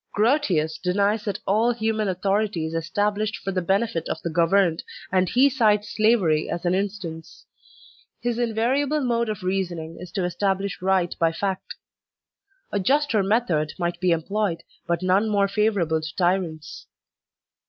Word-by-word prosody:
Grotius* 200 - +1
denies 200 +4 +1
that 205 -2 -2
all 220 +5 +3
human 220 -2 -1
authority 195 -1 0
is 160 - -5
established 205 +6 -1
for 195 - -4
the 185 -1 -1
benefit 190 -1 0
of - - -2
the 170 - -2
governed, 170 +1 +2 0.3
and 185 -1 +2
he 260 +3 +5
cites 215 -6 +1
slavery 205 -9 +2
as 170 +1 -4
an 175 - +2
instance. 190 -4 -4 0.7
His 240 -1 -2
invariable 255 +6 +1
mode 235 -3 0
of 210 -4 -4
reasoning 175 -4 -3
is 180 0 -9
to 190 - -1
establish 195 +2 -1
right 185 -2 +1
by 165 -1 +3
fact. 190 +2 -3 1.0
A 205 - 0
juster 275 +2 +2
method 190 -7 +1
might 175 -1 -2
be 180 -1 +2
em 165 -1 +1
ployed, 200 -3 -1 0.3
but 170 +1 -1
none 190 +4 +2
more 200 -1 +2
favorable 195 -6 +1
to 155 0 -7
tyrants. 175 -4 -1
195 Hz, 155 wpm, -24 LUFS, 175-215 Hz, 1.0 s, he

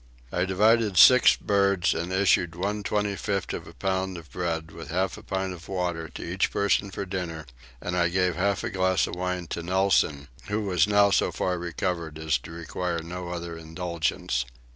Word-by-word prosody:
I 90 - +1
divided 105 +1 +3
six 125 +8 +8
birds 100 -3 +2
and 85 +2 -3
issued 95 -3 +2
one 100 +4 -2
25th 100 -2 -1
of - - -6
a - - -11
pound 95 -1 -1
of 80 -3 -12
bread 80 -2 -3
with 80 -3 -10
half 95 +3 0
a 105 - -11
pint 95 -2 -3
of 85 -2 -11
water 90 -3 -2
to - - -8
each 90 +3 0
person 100 0 +1
for 100 +1 -5
dinner, 90 -4 -4 0.3
and 90 +6 -3
I 85 -1 +2
gave 90 -1 +1
half 100 +3 0
a - - -2
glass 95 -1 +2
of - - -7
wine 90 0 -2
to 85 - -3
Nelson, 90 -5 +1 0.2
who 105 +2 -1
was 95 0 +2
now 100 -1 +4
so - - +2
far 90 -1 -1
recovered 85 -2 -3
as 80 -5 0
to 80 - -11
require 85 0 -3
no 90 +1 -6
other 85 -1 -5
indulgence. 80 -5 -2
90 Hz, 185 wpm, -26 LUFS, 85-100 Hz, 0.3 s, six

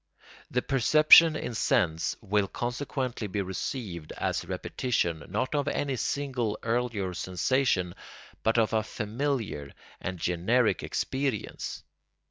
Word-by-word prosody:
The 125 - 0
perception 155 +4 +7
in 120 - -4
sense 80 -6 +1
will 105 -2 +1
consequently 120 0 -3
be 100 0 -2
received 95 - -5
as - - -1
a - - -15
repetition 85 - -1
not 125 +9 -1
of 145 -1 0
any 140 -2 -1
single 125 -5 -1
earlier 115 -5 -1
sensation 95 0 0 0.5
but 115 +1 +2
of 115 -1 +2
a 110 - +3
familiar 110 - -3 0.3
and 95 0 -4
generic 90 +9 +1
experience. 130 -5 -3
115 Hz, 115 wpm, -28 LUFS, 95-130 Hz, 0.5 s, perception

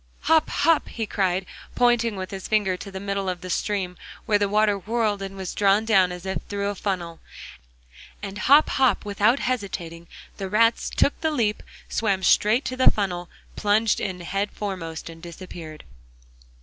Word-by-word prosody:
'Hop! 320 0 +3
hop!' 325 +1 +2
he 225 - -3
cried, 190 -2 0 0.3
pointing 240 -2 +3
with 185 -1 -6
his 190 -1 -6
finger 205 -4 +2
to 195 - -8
the 190 -1 -6
middle 200 -1 -2
of 180 -1 -4
the 185 - -5
stream, 190 -1 -1 0.3
where 210 -3 +3
the 205 -1 +1
water 210 0 +3
whirled 215 0 -1
and 195 0 -6
was 190 -2 -5
drawn 205 +2 +3
down 190 -5 +4
as 180 +1 -8
if 190 0 -2
through 200 0 -1
a - - -2
funnel. 180 -4 -3 1.0
And 200 0 -6
hop! 285 +7 +6
hop! 255 -7 +2
without 210 +4 +2
hesitating, 175 -9 -3 0.3
the 195 -2 -4
rats 230 +3 +3
took 285 - +1
the 320 - +1
leap, 225 -9 0 0.3
swam 200 -4 0
straight 215 +8 +4
to 255 - -3
the 255 - +6
funnel, 180 -4 -2 0.3
plunged 210 +2 +2
in 185 -2 -4
head 195 +4 -2
foremost 180 -6 -5
and 165 0 -10
disappeared. 170 -2 -9
200 Hz, 175 wpm, -24 LUFS, 185-220 Hz, 1.0 s, hop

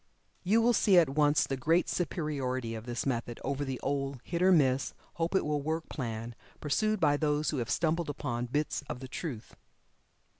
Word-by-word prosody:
You 220 +5 +3
will 240 +1 +4
see 200 -4 +4
at 165 -5 +6
once 145 0 +3
the 135 - -2
great 160 +7 +2
superiority 135 -8 -2
of 110 +1 -7
this 120 0 -3
method 120 -3 -2
over 140 +1 -1
the 135 -2 -4
old 135 -1 -2
"hit 170 0 -3
or 185 +1 +6
miss," 135 -6 +3 0.2
"hope 170 +3 -1
it 190 - +2
will 150 -1 0
work" 160 +3 -3
plan 115 -3 -4 0.3
pursued 215 +8 +1
by 145 -3 +3
those 150 0 +1
who 150 - -2
have 120 -3 -2
stumbled 165 0 0
upon 120 -4 -3
bits 145 +5 -1
of 125 - -4
the 130 - -7
truth. 130 -4 -6
145 Hz, 190 wpm, -30 LUFS, 130-165 Hz, 0.3 s, at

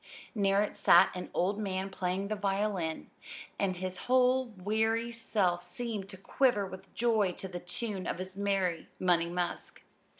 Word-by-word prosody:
Near 200 -2 +3
it 210 - -4
sat - - +6
an 180 - -6
old 195 +4 0
man 195 -1 -2
playing 190 +1 -2
the 215 - 0
violin; 195 -5 -1 0.5
and 190 -2 +1
his 185 0 -4
whole 255 0 +4
wiry 220 +3 0
self 200 -6 0
seemed 210 +1 -4
to 190 - -7
quiver 210 +1 +2
with 185 0 -10
joy 220 -6 +2
to 190 - -7
the 180 -1 -6
tune 190 +2 -4
of - - -2
his 185 +1 -7
merry 195 -4 0
"Money 170 -2 +2
Musk." 175 0 -4
195 Hz, 160 wpm, -31 LUFS, 185-215 Hz, 0.5 s, sat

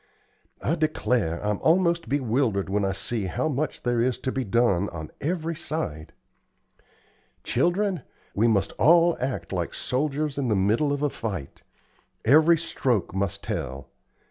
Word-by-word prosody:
I 155 - +1
declare 125 - 0
I'm 105 -1 0
almost 170 -4 +2
bewildered 120 -7 0
when 100 0 +1
I 95 - +1
see 105 +2 -2
how 95 - -1
much 150 0 -2
there 120 -2 +1
is 125 0 +1
to 130 - -1
be 130 - -2
done 100 -4 +2
on 80 -2 -7
every 165 +1 -1
side. 85 - -4 1.3
Children, 175 - +1 0.3
we 110 +4 +3
must 100 -3 +2
all 170 +2 +5
act 125 -10 -3
like - - -2
soldiers 145 +2 -1
in 135 - 0
the 110 - +2
middle 110 +10 +2
of 145 0 -1
a 145 - +1
fight. 95 -11 -5 0.6
Every 155 +6 +6
stroke 125 - -1
must 100 0 -2
tell. 65 +1 -4
125 Hz, 145 wpm, -25 LUFS, 100-155 Hz, 1.3 s, Every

